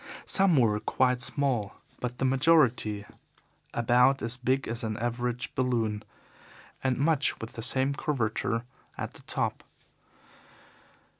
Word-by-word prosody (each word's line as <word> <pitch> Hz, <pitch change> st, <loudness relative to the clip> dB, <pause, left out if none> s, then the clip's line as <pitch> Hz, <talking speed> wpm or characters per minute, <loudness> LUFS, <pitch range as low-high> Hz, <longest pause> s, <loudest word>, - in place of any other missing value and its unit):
Some 195 Hz, -3 st, +3 dB
were 110 Hz, -4 st, +3 dB
quite 125 Hz, +2 st, +1 dB
small, 125 Hz, -6 st, +1 dB, 0.2 s
but 125 Hz, 0 st, -4 dB
the 135 Hz, -, 0 dB
majority 130 Hz, -7 st, +3 dB, 0.7 s
about 125 Hz, +3 st, +3 dB
as 115 Hz, +1 st, -1 dB
big 130 Hz, +2 st, 0 dB
as 115 Hz, +1 st, -4 dB
an 110 Hz, -1 st, -2 dB
average 120 Hz, +1 st, -3 dB
balloon, 115 Hz, -5 st, 0 dB, 0.8 s
and 130 Hz, -2 st, +1 dB
with 140 Hz, -, +1 dB
much 155 Hz, -4 st, +2 dB
the 115 Hz, +1 st, -7 dB
same 130 Hz, +3 st, +2 dB
curvature 115 Hz, -5 st, -1 dB, 0.3 s
at -, -, -5 dB
the -, -, -14 dB
top. -, -, -2 dB
125 Hz, 125 wpm, -28 LUFS, 115-135 Hz, 0.8 s, Some